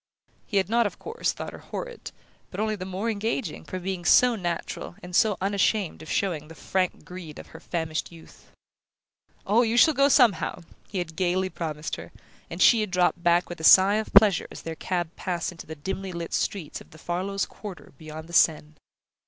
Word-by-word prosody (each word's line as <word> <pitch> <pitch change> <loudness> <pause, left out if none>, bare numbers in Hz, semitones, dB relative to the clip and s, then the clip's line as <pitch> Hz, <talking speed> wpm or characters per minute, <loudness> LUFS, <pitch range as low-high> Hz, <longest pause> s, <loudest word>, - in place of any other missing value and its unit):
He 200 - -1
had 190 - +2
not, 230 +1 +3
of 195 - -9
course, 455 +2 -2
thought - - -7
her - - -9
horrid, - - -7 0.4
but 190 - -7
only 215 0 0
the 185 -2 -6
more 190 +4 -3
engaging, 220 - -2
for 185 - -6
being 185 -1 -4
so 250 +6 +5
natural, 175 -2 -4
and 180 0 -6
so 215 -3 +4
unashamed 200 -2 0
of 155 - -10
showing 165 -6 -1
the 165 - -12
frank 185 +3 -2
greed 175 -4 -9
of - - -11
her 160 - -11
famished 160 -2 -3
youth. 165 -1 -16 1.0
"Oh, 215 +4 +4
you 235 0 +1
shall 315 +5 +7
go 275 0 +4
somehow!" 225 - +3 0.3
he 200 - -5
had 165 -3 -4
gaily 185 +2 0
promised 155 -2 -4
her; - - -10 0.4
and - - 0
she 230 -3 +6
had 210 - -2
dropped 180 -2 +1
back 175 +1 +3
with 175 - -8
a - - -8
sigh 195 +5 +7
of 220 - -3
pleasure 200 -3 +6
as - - -10
their 165 - -4
cab 175 0 -3
passed 175 -1 -3
into 165 - -11
the 160 - -7
dimly 190 +5 -5
lit 170 -1 -6
streets 185 -7 -2
of - - -16
the 155 - -15
Farlows' 185 +4 -2
quarter 205 -4 -10
beyond 155 0 -9
the 170 - -13
Seine... 155 -2 +3
185 Hz, 200 wpm, -26 LUFS, 170-205 Hz, 1.0 s, shall